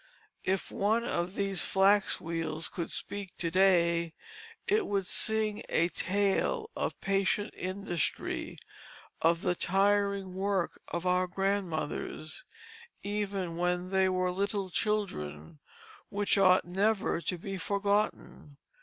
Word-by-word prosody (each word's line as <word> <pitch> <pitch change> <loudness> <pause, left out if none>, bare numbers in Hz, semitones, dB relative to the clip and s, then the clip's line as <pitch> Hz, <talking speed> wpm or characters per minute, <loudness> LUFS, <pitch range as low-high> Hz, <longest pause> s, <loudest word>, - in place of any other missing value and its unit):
If 190 0 -1
one 220 +4 +1
of 180 -5 -1
these 195 -3 0
flax 195 +1 +3
wheels 165 -1 -3
could 170 - -4
speak 200 -2 -4
to 170 -2 -1
day, 170 -3 +3 0.5
it 425 +1 +2
would 200 -2 0
sing 220 +1 0
a 170 +1 +3
tale 205 - 0
of - - -1
the - - -19
patient 195 +1 +1
industry, 185 -2 -2 0.6
of 165 +1 +3
the 180 - +2
tiring 200 +1 +1
work 190 -1 -1
of 170 +1 -4
our 180 0 +2
grandmothers, 175 -4 -2 0.6
even 200 -4 -2
when 180 +1 0
they 190 -1 +3
were 185 0 +1
little 195 0 -1
children, 150 - -2 0.5
which 205 0 +1
ought 185 -2 +5
never 195 0 +1
to 180 - -2
be 195 +3 -5
forgotten. 200 -6 -1
190 Hz, 120 wpm, -31 LUFS, 175-200 Hz, 0.6 s, ought